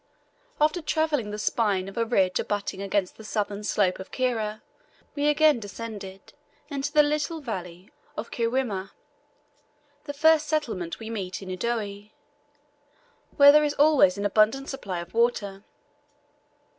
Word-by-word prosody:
After 310 +4 +2
travelling 305 -7 0
the 210 - -5
spine 205 -3 0
of 195 - -9
a 230 - 0
ridge 190 -6 +2
abutting 205 -2 -3
against 200 -1 -1
the 220 - -11
southern 210 -1 -3
slope 200 -3 +1
of 190 - -8
Kira 225 -4 -2 0.5
we 290 0 0
again 295 -2 +4
descended 205 -3 -8 0.4
into 285 0 -3
the 300 0 +6
little 300 +2 -1
valley 185 - -7 0.3
of 230 - -5
Kiwrima, 230 -5 -2 1.1
the 285 - -5
first 315 +1 +4
settlement 225 - -2
we 225 0 -7
meet 195 -3 -5
in 190 - -8
Udoe, 205 +1 -3 1.3
where 285 0 +9
there 300 +1 +5
is 295 -1 0
always 285 -11 +5
an 200 - -3
abundant 220 +7 +2
supply 190 -10 -4
of 170 - -11
water. 210 -4 0
220 Hz, 140 wpm, -26 LUFS, 195-285 Hz, 1.3 s, where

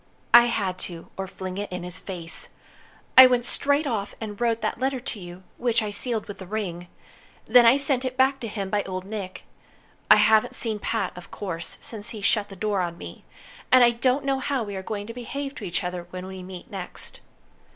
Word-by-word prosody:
"I 240 0 +10
had 195 -6 -1
to, 170 -2 -10
or 190 0 -4
fling 185 0 -6
it 205 - -4
in 180 -1 -4
his 180 0 -4
face. 170 -4 -5 0.7
I 260 0 +12
went 245 -1 +1
straight 285 +4 +2
off 215 -6 -2
and 210 -1 -6
wrote 230 -1 +1
that - - -2
letter 265 0 0
to 240 -3 -6
you, 175 0 -10
which 235 -2 +1
I 210 - -3
sealed 225 +1 -1
with 205 - -8
the 190 - -8
ring. 180 -4 -4 0.6
Then 240 +1 +7
I 245 +4 +7
sent 275 -2 +2
it 255 0 -3
back 265 +1 +3
to 235 - -5
him 200 -3 -4
by 210 - +2
Old 185 -1 -5
Nick. 200 -3 -6 0.7
I - - +10
haven't 220 0 +4
seen 220 -3 0
Pat, 205 -3 -2
of 180 - -11
course, 170 -5 -5
since 215 -1 -6
he 215 - -7
shut 205 +1 +2
the 195 - -9
door 205 0 0
on 170 -1 -3
me. - - -10 0.5
And 255 -1 +8
I 240 - +6
don't 255 +4 +1
know 270 -1 +1
how 265 -2 -1
we 205 -2 -6
are 190 - -4
going 205 +1 -5
to 230 - -7
behave 275 +4 -5
to - - -7
each 180 +1 -1
other 180 -1 -4
when 185 0 -7
we 190 0 -8
meet 185 +2 -10
next." 190 -3 -7
210 Hz, 220 wpm, -25 LUFS, 185-240 Hz, 0.7 s, I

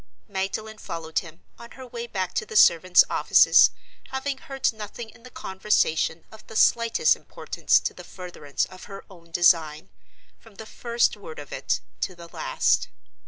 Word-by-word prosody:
Magdalen 210 +2 -4
followed 160 -1 -3
him, 165 0 -13 0.2
on 235 - -11
her 260 - -9
way 240 -1 -7
back 185 -5 -3
to - - -1
the 215 - -10
servants' 180 -2 +6
offices, - - +5 0.4
having 265 +1 -4
heard 270 -3 -1
nothing 220 +1 -8
in 235 - -20
the 255 - -13
conversation 190 -6 0
of 220 -1 -14
the 220 - -11
slightest 230 - +4
importance - - 0
to - - -3
the - - -11
furtherance 175 -6 -4
of 185 0 -13
her 195 -1 -10
own 170 -3 -16
design, 165 -3 +2 0.5
from 225 -3 -19
the 220 - -9
first 235 +1 0
word 475 -1 -11
of - - -10
it - - -1 0.2
to 185 - -3
the 170 -1 -12
last. - - 0
200 Hz, 165 wpm, -25 LUFS, 175-235 Hz, 0.5 s, servants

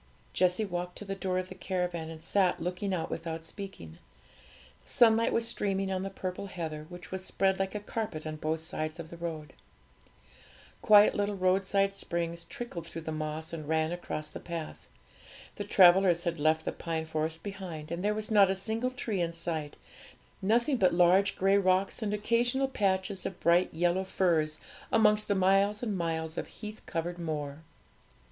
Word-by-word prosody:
Jessie 185 +4 +2
walked 180 -1 -4
to 210 - -8
the 195 - -3
door 190 -1 -2
of 185 0 -2
the - - -7
caravan, 180 -4 -3
and 160 0 -9
sat 185 +1 +2
looking 180 +4 -2
out 175 -3 -2
without 165 -1 -4
speaking. 175 - -9 0.8
The - - -11
sunlight 230 -1 +5
was 230 0 +1
streaming 195 -3 -1
on 185 -1 -1
the 195 - -3
purple 190 0 -5
heather, 160 -4 -5
which 175 0 -10
was 190 0 -4
spread 190 0 +1
like 195 +1 -1
a - - -1
carpet 205 -7 -4
on 155 0 -4
both 155 +1 -2
sides 155 -1 -4
of 160 -1 -8
the 170 - -8
road. 160 -3 -5 1.3
Quiet 210 -1 +7
little 205 0 -1
roadside 195 +1 +2
springs 170 -3 -2
trickled 170 -4 -7
through 165 -1 -7
the 160 - -4
moss 155 +1 -4
and 155 -3 -6
ran 160 +1 +1
across 165 -3 -4
the - - -8
path. 165 -2 -7 0.7
The 205 - -2
travellers 180 -3 +6
had 170 -2 -2
left 155 +1 +2
the - - 0
pine 160 -1 -3
forest 160 +1 -3
behind, 180 -6 -6
and 170 +2 -3
there 210 +1 +1
was 215 +1 -4
not 200 -3 +6
a 190 - +1
single 220 +6 -2
tree 230 -6 -3
in 170 -1 -1
sight; 160 -3 -3 0.6
nothing 235 +7 +2
but 185 -5 +3
large 180 +3 +4
grey 195 +1 +3
rocks 185 +3 +1
and 210 -2 -1
occasional 240 +5 +1
patches 195 -5 0
of 185 - -8
bright 170 +2 +3
yellow 175 +3 +1
furze 160 -5 +1 0.3
amongst 210 -1 +4
the 200 - +2
miles 195 +3 +3
and 215 -4 -1
miles 160 -2 -2
of - - -5
heath 215 0 -9
covered 175 +1 -3
moor. 150 -3 -4
185 Hz, 180 wpm, -30 LUFS, 165-200 Hz, 1.3 s, Quiet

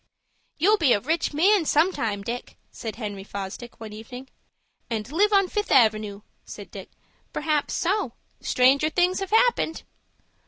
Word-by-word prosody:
"You'll 410 +7 +3
be 280 -7 +4
a - - +2
rich 320 +8 -1
man 370 +6 +3
some 315 +4 +3
time, 205 -3 -2
Dick," 240 +4 -6
said 225 -3 -6
Henry 205 -4 -6
Fosdick, 200 +4 -7
one 220 -2 -8
evening. 245 +4 -10 0.6
"And 225 +1 -4
live 405 +7 +3
on 395 -2 +4
Fifth 415 +2 -3
Avenoo," 215 -4 +3 0.2
said - - -10
Dick. - - -9 0.4
"Perhaps 300 -1 -1
so. 370 - 0 0.3
Stranger 270 +4 +3
things 360 +3 +1
have 390 -1 -4
happened." 445 -6 +2
275 Hz, 150 wpm, -25 LUFS, 220-360 Hz, 0.6 s, be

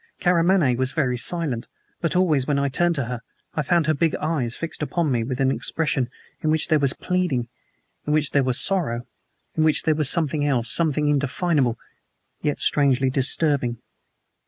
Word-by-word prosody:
Karamaneh 175 -6 +3
was 130 0 0
very 130 -6 0
silent, 125 -1 -2 0.3
but 165 +1 -1
always 155 -8 +2
when 145 -2 +1
I 140 0 +1
turned 175 +5 +1
to 140 -5 -1
her 120 0 -5 0.3
I 150 - -1
found 170 +2 +1
her 155 - +2
big 160 +2 0
eyes 145 -7 -2
fixed 165 -1 -6
upon 155 0 -1
me 120 -2 0
with 130 +2 -4
an 135 -1 +2
expression 135 0 -1 0.3
in 155 - 0
which 155 0 +1
there 155 - +4
was 140 -2 +1
pleading, 175 -10 -1 0.6
in 150 - +1
which 150 -2 +1
there 140 - +3
was 130 -2 +1
sorrow, 145 -12 0 0.5
in 160 - +1
which 155 -1 +2
there 160 - +2
was 150 -3 +3
something 155 -3 +1
else 130 -5 +1
something 150 -3 +2
indefinable, 145 -2 +1 0.6
yet 145 - -1
strangely 135 -2 +2
disturbing. 135 -2 +1
145 Hz, 180 wpm, -23 LUFS, 130-160 Hz, 0.6 s, there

